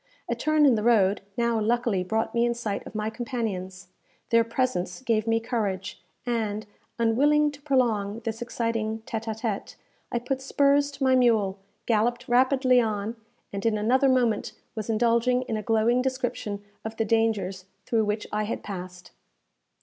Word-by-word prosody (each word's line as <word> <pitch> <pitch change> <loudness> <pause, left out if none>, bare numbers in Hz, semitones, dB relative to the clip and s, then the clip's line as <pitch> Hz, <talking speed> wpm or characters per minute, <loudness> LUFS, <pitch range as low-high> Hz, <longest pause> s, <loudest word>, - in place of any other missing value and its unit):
A - - 0
turn 310 -1 +3
in 270 - +6
the 215 - +1
road 210 -4 +3 0.2
now 235 -1 +1
luckily 230 -3 +1
brought 220 +4 -1
me 235 - +2
in 240 0 +1
sight 220 -4 -4
of - - -11
my 215 0 -2
companions. 195 -6 -4 0.4
Their 230 0 +5
presence 230 -5 -1
gave 225 -3 +1
me 225 0 +3
courage, 210 -5 -3 0.2
and, 215 -3 -1 0.3
unwilling 290 +6 +3
to 290 0 -14
prolong 230 -7 +1
this 225 0 -4
exciting 225 -2 -2
téte 225 0 -4
à 220 -1 -4
téte, 220 -4 -3 0.4
I - - 0
put 260 +2 -2
spurs 285 +1 +3
to 275 0 -4
my 260 -1 +4
mule, 220 -6 +3 0.3
galloped 235 +2 +1
rapidly 255 0 +4
on, 215 0 -2 0.4
and 200 0 -4
in 225 -2 +2
another 255 +6 +3
moment 240 -5 +1 0.2
was 215 0 -5
indulging 235 +3 +2
in 225 - -3
a 215 - -2
glowing 225 +3 +2
description 245 -6 -3 0.2
of 220 0 -6
the 225 - +1
dangers 210 -4 0 0.2
through 225 -2 +1
which 210 +1 -2
I 210 0 0
had 215 - -4
passed. 180 -2 -8
225 Hz, 165 wpm, -26 LUFS, 210-245 Hz, 0.4 s, in